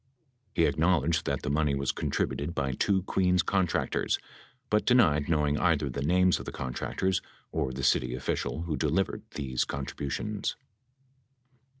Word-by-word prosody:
He 85 - +4
acknowledged 80 +1 +2
that 70 -1 -1
the 75 - -1
money 75 -1 +2
was 70 -1 0
contributed 75 +4 -2
by 70 -1 0
two 95 +8 +1
Queens 90 -2 +2
contractors, 95 -4 +1 0.5
but 105 0 +3
denied 85 - +4
knowing 75 -2 +2
either 75 -6 +2
the 70 - -4
names 90 +5 +3
of - - -8
the - - -5
contractors 85 +8 -2 0.3
or 75 -5 -1
the 65 +1 -5
city 60 - +2
official 65 +4 -2
who 85 -3 -2
delivered 65 - 0
these 65 -4 -1
contributions. 70 +9 -3
75 Hz, 140 wpm, -29 LUFS, 70-90 Hz, 0.5 s, He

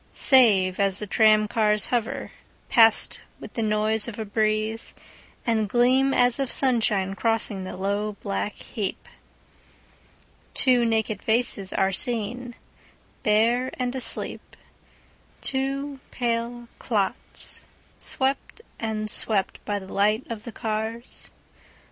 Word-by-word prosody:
Save, 205 -9 +6
as 195 -1 +2
the 210 - -3
tram 215 0 +4
cars 210 -1 +2
hoverPast 225 -1 +1 0.2
with - - -10
the 230 - -3
noise 215 0 +1
of 230 - -7
a 220 - -4
breezeAnd 215 +1 -2
gleam 255 +5 +3
as 245 0 +3
of 270 -3 -1
sunshine 215 -7 +2
crossing 210 -3 -1
the 185 - -7
low 200 +2 -2
black 200 +1 -2
heap, 210 -6 -6 1.5
Two 250 -3 +3
naked 220 -2 0
faces 220 -4 0
are 190 - +1
seenBare 240 +3 0 1.2
and 250 -1 -2
asleep, 250 -4 -1 0.8
Two 275 +1 -2
pale 235 0 -3
clots 205 -5 -1 0.4
swept 270 +10 -2 0.2
and 215 -1 -3
swept 210 -2 -1
by 205 - -1
the 190 -1 -9
light 215 +4 +1
of 220 -2 -6
the 235 - -6
cars. 220 +2 -4
220 Hz, 110 wpm, -24 LUFS, 210-245 Hz, 1.5 s, Save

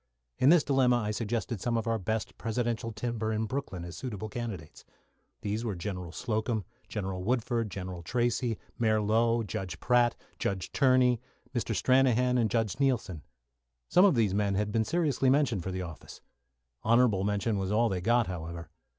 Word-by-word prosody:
In 130 - +5
this 170 -1 +6
dilemma 130 -3 +3
I 105 -3 0
suggested 115 -1 -2
some 120 -1 0
of 115 - -2
our 115 -1 0
best 110 +3 -2
presidential 115 0 -2
timber 110 -1 -2
in 110 0 0
Brooklyn 105 -7 -4
as 85 - -8
suitable 110 -5 -5
candidates. 105 -9 -6 0.6
These 105 +2 -2
were 110 -5 -2
General 90 -2 -5
Slocum, 110 -1 -2 0.2
General 95 -3 -3
Woodford, 115 0 0
General 90 -1 -6
Tracey, 120 +3 0 0.2
Mayor 110 -2 +3
Low, 115 +2 +2
Judge 90 -4 -5
Pratt, 120 -1 +3 0.2
Judge 95 -2 -2
Tierney, 130 -3 +4 0.3
Mr. 115 -3 -1
Stranahan, 125 +2 +3
and 110 -2 +2
Judge 110 -3 0
Neilson. 120 - 0 0.7
Some 180 +2 +6
of 190 -7 +5
these 110 -5 +2
men 100 -1 +1
had 105 +1 0
been 110 +1 +1
seriously 145 -4 +1
mentioned 130 -8 +2
for 95 - -4
the 95 0 -3
office. 85 -3 -10 0.6
Honourable 115 -4 +4
mention 105 +1 0
was 95 0 -2
all 115 +3 +3
they 95 -4 -2
got, 120 +4 +3
however. 85 -2 -6
110 Hz, 170 wpm, -29 LUFS, 100-120 Hz, 0.7 s, this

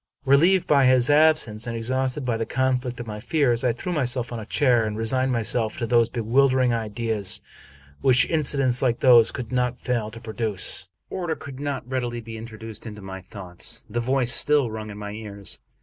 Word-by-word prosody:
Relieved 170 +7 +4
by 140 -3 +4
his 130 +2 +4
ab 155 +1 +6
sence, 110 -3 -5
and 115 -1 -3
exhausted 130 +4 -1
by 120 -2 0
the 115 - -1
conflict 125 0 -1
of 120 - -5
my 105 -2 -6
fears, 125 -2 +1
I 125 - +3
threw 175 +10 -4
myself 125 -5 -1
on 120 - -4
a 110 - -8
chair, 125 -5 +3
and 110 -1 -3
resigned 130 +4 +1
myself 115 -1 -1
to 120 - -2
those 120 -1 +3
bewildering 130 +2 +2
ideas 110 -3 -1 0.6
which 130 -1 +4
incidents 140 -5 +1
like 120 -3 +1
these 120 -4 +7
could 125 -2 -6
not 125 -1 0
fail 120 -4 -2
to 115 +1 -10
produce. 110 -4 -1 0.2
V - - -5
Order 175 -3 -2
could 135 -3 -10
not 140 -4 -4
readily 125 -2 -3
be 115 -1 -9
introduced 110 0 -9
into 105 -2 -9
my 95 0 -7
thoughts. 95 +4 -8
The 115 +2 -3
voice 125 0 +1
still 145 -5 +2
rung 110 0 -6
in 100 - -8
my 105 -1 -6
ears. 105 -2 -6
120 Hz, 195 wpm, -24 LUFS, 110-130 Hz, 0.6 s, these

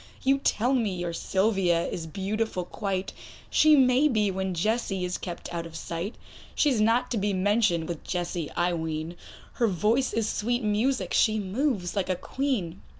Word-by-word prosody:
You 270 +1 +3
tell 245 -1 +1
me 220 -7 +1
your 175 -1 -3
Sylvia 190 -2 +1
is 165 -2 -4
beautiful 195 +1 -2
quite; 195 0 -3 0.4
She 310 -1 +6
may 260 +1 +5
be, 215 -7 +1
when 190 -1 -2
Jessie 195 0 0
is 180 - -3
kept 175 -1 -7
out 170 -1 -3
of 165 - -13
sight; 170 +6 -4 0.4
She 295 - +3
is 230 -5 +1
not 235 +3 +2
to 230 - 0
be 205 0 0
mentioned 195 -3 +2
with 170 -3 -5
Jessie, 175 -3 -3
I 175 0 +1
ween, 160 0 -3 0.4
Her 235 - +1
voice 215 +7 +1
is 225 -1 0
sweet 240 +3 -1
music, 225 +5 0
she 220 -1 +3
moves 205 -2 -1
like 195 -2 -1
a 185 - +2
Queen. 200 -6 -2
200 Hz, 175 wpm, -27 LUFS, 175-235 Hz, 0.4 s, She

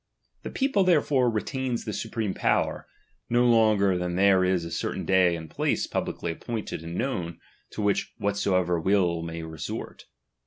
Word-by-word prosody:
The - - -6
people, 265 -8 +1
therefore, 145 -8 +3
retains 120 +2 -2
the 110 - -3
supreme 110 -3 -3
power, - - 0 0.4
no 120 +1 +3
longer 105 -5 +4
than 90 0 -2
there 95 0 +4
is 90 -2 +1
a 85 - -7
certain - - -3
day 95 -2 +4
and 80 -1 -7
place - - -1
publicly 85 - -3
appointed 110 0 -5
and 85 +2 -6
knovrn, 90 -10 -2 0.3
to 105 - -5
which 100 -1 0
whosoever 95 -4 +1
will 90 -2 +2
may 85 0 -5
resort. 80 -1 -6
100 Hz, 155 wpm, -26 LUFS, 85-115 Hz, 0.4 s, longer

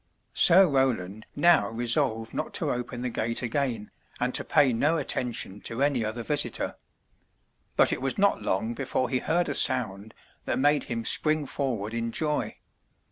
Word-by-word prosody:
Sir 185 +2 +6
Roland 110 -8 -1
now 170 +3 +4
resolved 115 0 0
not - - -4
to - - +1
open 125 0 -4
the 125 - -2
gate 115 +2 -2
again, 120 -3 -2 0.3
and - - -1
to - - +1
pay 135 -4 +3
no 150 +8 +1
attention 120 -8 -2
to 115 +4 -1
any 140 -5 +1
other 110 +2 -4
visitor. 145 +3 0 1.0
But - - +4
it - - -4
was 135 0 -2
not 200 0 +2
long 110 +5 -1
before 130 0 -2
he 130 - 0
heard 175 +5 0
a - - -2
sound 110 -4 +1 0.3
that - - -1
made 145 +2 +2
him 115 -2 -4
spring 155 -1 +2
forward 120 -6 -3
in 115 0 -3
joy. 150 +3 -2
125 Hz, 165 wpm, -26 LUFS, 115-145 Hz, 1.0 s, Sir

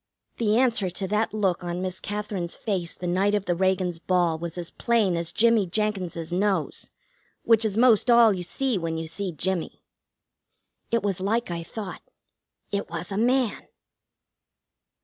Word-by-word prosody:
The 220 -1 +2
answer 235 -7 +2
to 190 +2 -4
that 210 +2 +1
look 195 -4 0
on 175 0 -3
Miss 185 0 -3
Katherine's 205 -4 -4
face 190 -7 -3
the 180 - -7
night 190 +4 +2
of 200 -1 -1
the 175 - +1
Reagans' 185 -1 0
ball 175 -2 +1
was 170 +1 -5
as 175 -1 -5
plain 220 -6 +1
as 170 0 -2
Jimmie 225 -3 +4
Jenkins's 180 -4 -2
nose, 190 -3 -1 0.5
which 230 -1 +4
is 215 -2 0
most 240 -1 +5
all 235 -2 +7
you 185 - -4
see 240 +5 -1
when 165 -1 -3
you 160 - -3
see 185 +4 -3
Jimmie. 175 +2 -3 1.1
It 230 -2 +1
was 195 -3 -1
like 220 +1 0
I 170 -1 -3
thought. 190 +2 -7 0.7
It 200 -2 -2
was 170 +2 -5
a - - -2
man. 245 0 +1
190 Hz, 165 wpm, -25 LUFS, 175-215 Hz, 1.1 s, all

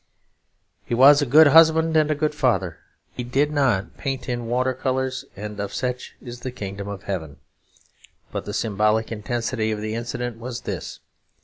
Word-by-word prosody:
He 120 - -2
was 140 +4 +7
a 145 - 0
good 155 +6 +7
husband 160 +2 +5
and 155 -1 +4
a 155 - +1
good 150 +1 0
father; 95 - 0 0.3
he 125 - -5
did 140 +5 +1
not 130 -10 0
paint 135 -1 -4
in 120 -2 -3
water 130 +2 +1
colours; 130 0 -2
and 105 +1 -7
of 100 0 -4
such 125 -1 -4
is 120 -1 -9
the 130 - -5
Kingdom 100 -4 -6
of 100 -1 -7
Heaven. 80 -7 -5 0.9
But - - -4
the 105 - -5
symbolic 110 +1 +1
intensity 115 0 -2
of 105 - -3
the 110 +1 -4
incident 120 0 -4
was 120 0 -6
this. - - -6
120 Hz, 175 wpm, -23 LUFS, 105-135 Hz, 0.9 s, was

